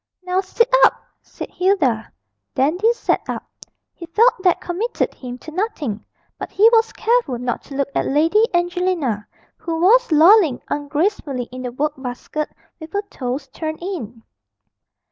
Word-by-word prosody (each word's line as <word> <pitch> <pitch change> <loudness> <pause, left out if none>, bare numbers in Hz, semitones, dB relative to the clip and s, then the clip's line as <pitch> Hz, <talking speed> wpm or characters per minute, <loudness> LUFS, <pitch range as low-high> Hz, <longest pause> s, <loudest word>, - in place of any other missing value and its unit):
'Now 365 +1 0
sit 420 +5 +1 0.2
up,' - - +5 0.2
said - - -9
Hilda. 310 - +1 0.4
Dandy 345 - +2
sat 475 - 0
up. - - -3 0.5
He 340 - -10
felt 455 +9 +4
that 370 -2 +2
committed 385 +7 -2
him 250 -1 -8
to 315 - -11
nothing, 310 - -3 0.4
but - - -5
he 425 +3 +5
was 455 0 +4
careful 455 - +1
not 245 0 -3
to 275 - -9
look 275 0 -1
at - - 0
Lady 325 +10 +3
Angelina, 350 - 0 0.3
who 325 -1 -4
was 455 +5 +4
lolling 320 - +6
ungracefully 290 -2 -1
in 255 0 -7
the 250 -1 -4
work 290 +4 -1
basket 265 +4 -5 0.3
with 320 0 -10
her 405 +1 -1
toes 260 +2 -4
turned 315 +2 -5
in. 245 - -6
325 Hz, 150 wpm, -20 LUFS, 265-385 Hz, 0.5 s, lolling